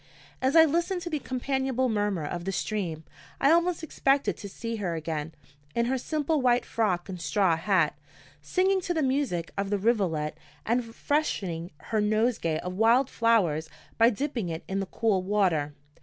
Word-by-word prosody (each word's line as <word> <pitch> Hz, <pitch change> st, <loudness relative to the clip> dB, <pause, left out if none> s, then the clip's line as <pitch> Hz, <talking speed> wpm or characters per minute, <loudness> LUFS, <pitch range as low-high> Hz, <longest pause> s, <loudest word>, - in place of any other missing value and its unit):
As 260 Hz, +3 st, +1 dB
I 325 Hz, -1 st, +9 dB
listened 340 Hz, +4 st, 0 dB
to 345 Hz, -, -5 dB
the 305 Hz, -, -1 dB
companionable 260 Hz, 0 st, -1 dB
murmur 205 Hz, -7 st, 0 dB
of 170 Hz, +3 st, -4 dB
the 195 Hz, -, -1 dB
stream, 180 Hz, -6 st, -3 dB, 0.4 s
I 280 Hz, -, +4 dB
almost 340 Hz, 0 st, +2 dB
expected 275 Hz, -2 st, +1 dB
to 200 Hz, -, -8 dB
see 230 Hz, +3 st, -5 dB
her 180 Hz, -5 st, -2 dB
again, 160 Hz, -1 st, -4 dB, 0.4 s
in 235 Hz, -, +2 dB
her 260 Hz, +2 st, 0 dB
simple 305 Hz, +2 st, 0 dB
white 245 Hz, -1 st, +3 dB
frock 190 Hz, -6 st, 0 dB
and 180 Hz, -3 st, -7 dB
straw 170 Hz, +3 st, +2 dB
hat, 170 Hz, -2 st, +1 dB, 0.5 s
singing 380 Hz, +1 st, +1 dB
to 350 Hz, -1 st, -2 dB
the 315 Hz, -, +1 dB
music 260 Hz, -, 0 dB
of 200 Hz, 0 st, -1 dB
the 205 Hz, -, +1 dB
rivulet, 190 Hz, -8 st, 0 dB, 0.3 s
and 240 Hz, +2 st, +1 dB
freshening 215 Hz, -, -2 dB, 0.2 s
her 215 Hz, -1 st, +2 dB
nosegay 215 Hz, -6 st, +1 dB
of 180 Hz, -, -4 dB
wild 230 Hz, +6 st, +3 dB
flowers 180 Hz, -10 st, +2 dB, 0.3 s
by 230 Hz, +1 st, +7 dB
dipping 245 Hz, -, -2 dB
it 165 Hz, +1 st, -5 dB
in 195 Hz, +1 st, -2 dB
the 195 Hz, -, -3 dB
cool 210 Hz, -2 st, +1 dB
water. 180 Hz, -7 st, +1 dB
215 Hz, 170 wpm, -27 LUFS, 175-265 Hz, 0.5 s, I